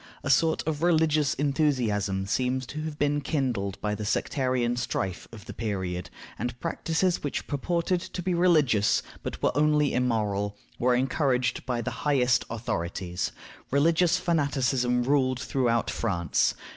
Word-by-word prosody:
A 140 - +1
sort 160 +4 +3
of 155 -1 -1
religious 160 -3 +3
enthusiasm 125 -10 0
seems 130 +5 0
to 150 +5 -6
have 155 -2 -5
been 145 0 +1
kindled 120 - -1
by 105 0 -1
the 105 +1 -4
sectarian 125 +2 0
strife 95 -6 -3
of 110 -3 -11
the - - -8
period, 95 -5 -3 0.3
and 120 0 -3
practices 170 +2 0
which 145 - -3
purported 170 +5 -1
to 180 0 -6
be 185 0 0
religious, 155 - +3 0.2
but - - -6
were - - +2
only 150 -1 +3
immoral, 105 -5 0 0.2
were 125 0 +3
encouraged 130 -1 0
by 120 -2 -1
the 130 - -3
highest 130 -4 +2
authorities. 90 -5 -3 0.4
Religious 165 +5 +3
fanaticism 135 -7 +1
ruled 130 -1 +2
throughout 120 -4 0
France. 85 -8 0
130 Hz, 140 wpm, -27 LUFS, 115-150 Hz, 0.4 s, sort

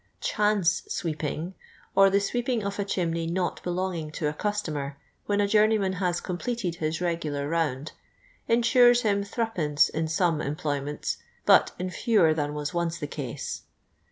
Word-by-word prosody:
'• - - -44
Chance 210 -4 +2
sweep 160 -2 -3
ing," 160 +5 -3 0.4
or 195 0 +7
the 200 +1 +3
sweeping 240 +2 -1
of 200 +1 -4
a - - +2
chimney 170 -4 -1
not 175 +1 -1
belonging 175 -3 -2
to 150 - -1
a 150 - -1
customer, 150 -8 -3 0.3
when 205 0 +1
a 205 - +3
journeyman 210 -2 +3
luis 175 -2 +1
completed 185 +1 -3
his 155 0 -1
regijlar 160 -5 -2
round, 155 -3 -1 0.6
ensures 240 +1 +5
him 200 -2 +2
'6tL 180 -9 +1
in 160 0 -1
some 165 -1 +1
employ 145 0 -2
m'.'nts, 145 +2 -3 0.3
but - - +5
in 185 +1 -3
fewer 205 -8 +3
than 150 -1 -2
was 145 -1 -3
once 170 -1 -1
the 150 - -4
case. 140 -4 -5
175 Hz, 160 wpm, -27 LUFS, 155-205 Hz, 0.6 s, or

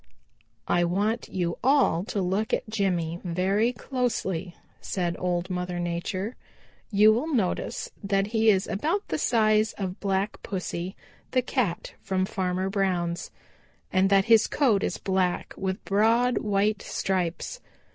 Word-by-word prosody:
"I 175 0 +3
want 205 +7 0
you 175 -2 -2
all 260 - +3
to 200 -3 -2
look 195 +5 +1
at - - -6
Jimmy 180 -6 -1
very 190 +6 +1
closely," 215 -9 -2 0.2
said 175 -2 -2
Old 180 0 -1
Mother 180 0 -2
Nature. 180 +5 -3 0.5
"You 215 +1 +6
will 280 +9 -1
notice 215 -10 -1
that 195 0 +1
he 220 +1 +2
is 190 -3 +3
about 325 - -1
the - - -1
size 215 -1 +3
of 190 -1 -5
Black 195 0 -1
Pussy, 185 -1 -4 0.3
the 255 -1 +1
Cat 235 -9 -1
from 190 -1 0
Farmer 185 0 -1
Brown's, 185 -4 -1 0.6
and 190 0 +4
that 195 -1 +4
his 225 -2 +5
coat 235 -9 +2
is - - -1
black 185 -2 -1
with 190 +1 -3
broad 230 +5 +3
white 205 0 +1
stripes. 185 - -2
195 Hz, 135 wpm, -26 LUFS, 180-220 Hz, 0.6 s, You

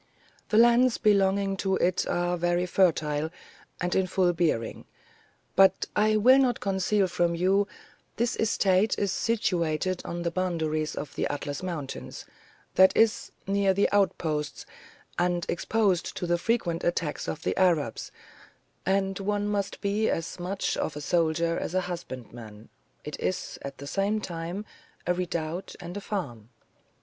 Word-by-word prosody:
The 215 - +2
lands 240 +1 +5
belonging 195 -2 +2
to 190 0 0
it 180 0 +1
are 175 0 0
very 175 +1 +1
fertile, 160 -4 +1 0.5
and 180 0 -1
in 190 -1 +2
full 180 -1 +2
bearing; 160 -10 -1 0.7
but 190 -1 +5
I 215 0 +3
will 255 +5 +6
not 250 -3 +2
conceal 195 +1 +1
from 175 -1 0
you, 195 +4 +2 0.5
this 235 +2 +1
estate 200 -1 +2
is 200 -2 0
situated 185 -5 0
on 170 0 -4
the 170 - -1
boundaries 160 -4 -1
of 145 - -6
the - - -1
Atlas 145 0 -4
mountains, 165 -7 -6 0.5
that 190 0 +5
is, 225 -1 +2
near 195 -1 +2
the 200 - +3
outposts, 155 -7 0 0.5
and 175 -1 +1
exposed 195 0 0
to - - -2
the 175 0 +1
frequent 175 -5 0
attacks 170 -3 -1
of 160 - -4
the - - 0
Arabs, 165 -10 +1 0.8
and 195 0 +1
one 205 +1 -1
must 200 -1 -2
be 205 +2 +1
as 165 +2 -3
much 185 +3 -2
of 150 - -2
a 150 - -5
soldier 165 +2 +1
as 180 - -4
a 185 - +3
husbandman: 120 -11 -8 0.3
it 150 - -6
is, 185 - -3
at 140 0 -7
the 140 - -8
same 200 +7 0
time, 175 +2 -5 0.4
a 180 - +2
redoubt 175 0 -3
and 175 0 -8
a 205 - -4
farm. 120 - -5
180 Hz, 150 wpm, -27 LUFS, 165-200 Hz, 0.8 s, will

